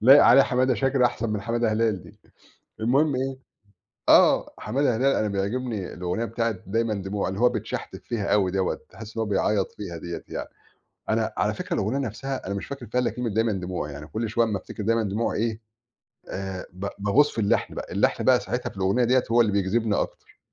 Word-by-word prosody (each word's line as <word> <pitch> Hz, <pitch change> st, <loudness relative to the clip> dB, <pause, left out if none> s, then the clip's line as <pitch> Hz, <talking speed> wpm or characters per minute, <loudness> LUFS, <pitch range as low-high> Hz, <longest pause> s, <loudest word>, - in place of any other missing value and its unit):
لايق 135 Hz, +6 st, +8 dB
عليه 135 Hz, -, +8 dB
حمادة 130 Hz, -1 st, +2 dB
شاكرة 135 Hz, 0 st, +3 dB
أحسَن 115 Hz, -2 st, -3 dB
من 105 Hz, -1 st, -1 dB
حمادة 115 Hz, +1 st, 0 dB
هلال 110 Hz, -4 st, +1 dB
دي. -, -, -16 dB, 0.6 s
المهم 135 Hz, +6 st, +3 dB
إيه، 135 Hz, +1 st, -2 dB, 0.7 s
آه، -, -, +5 dB
حمادة 135 Hz, -3 st, 0 dB
هلال 135 Hz, +4 st, +3 dB
أنا 110 Hz, -, +1 dB
بيعجبني 105 Hz, +1 st, -2 dB
الأُغنية 90 Hz, +5 st, -2 dB
بتاعة 115 Hz, +1 st, -1 dB
دايمًا 110 Hz, +3 st, 0 dB
دموع 100 Hz, 0 st, -2 dB
اللي 95 Hz, +2 st, -4 dB
هو 125 Hz, -, +6 dB
بيتشحتِف 110 Hz, -3 st, -5 dB
فيها 110 Hz, -4 st, -2 dB
أوي 100 Hz, -3 st, +3 dB
دَوّة، 95 Hz, 0 st, -1 dB
تحس 110 Hz, 0 st, -11 dB
إن -, -, -1 dB
هو -, -, -1 dB
بيعيّط 100 Hz, 0 st, +1 dB
فيها 90 Hz, -5 st, -7 dB
دِيّة 85 Hz, +1 st, -6 dB
يعني. -, -, -5 dB, 0.6 s
أنا، -, -, +1 dB
على -, -, +1 dB
فكرة -, -, -4 dB
الأغنية 110 Hz, +7 st, 0 dB
نفْسها 135 Hz, +2 st, -5 dB
أنا 100 Hz, -, -2 dB
مش 100 Hz, -, -4 dB
فاكر 135 Hz, -3 st, -7 dB
فيها 125 Hz, +4 st, 0 dB
إلّا 125 Hz, -, +1 dB
كلمة 125 Hz, 0 st, -3 dB
دايًما 110 Hz, +2 st, +1 dB
دموع، 90 Hz, -5 st, -4 dB
يعني 70 Hz, +1 st, -8 dB
كل 110 Hz, +8 st, -3 dB
شويّة 115 Hz, +2 st, +2 dB
أمّا 105 Hz, -2 st, -1 dB
أفتكر 100 Hz, +3 st, -7 dB
دايمًا 115 Hz, +2 st, +2 dB
دموع 105 Hz, +3 st, -1 dB
إيه 110 Hz, 0 st, -1 dB, 0.7 s
آآ، 95 Hz, -1 st, -5 dB
ب 95 Hz, +2 st, -5 dB
باغوص 115 Hz, +9 st, +3 dB
في -, -, -2 dB
اللّحن 100 Hz, -, +1 dB
بقى، -, -, -5 dB
اللحن -, -, +1 dB
بقى -, -, +5 dB
ساعتها -, -, -3 dB
في -, -, -17 dB
الأغنية 95 Hz, +6 st, +2 dB
دِيّة 125 Hz, +2 st, +3 dB
هو 120 Hz, -, +5 dB
اللي 110 Hz, -3 st, +3 dB
بيجذبني 100 Hz, +3 st, +1 dB
أكتر -, -, -5 dB
110 Hz, 205 wpm, -25 LUFS, 100-120 Hz, 0.7 s, لايق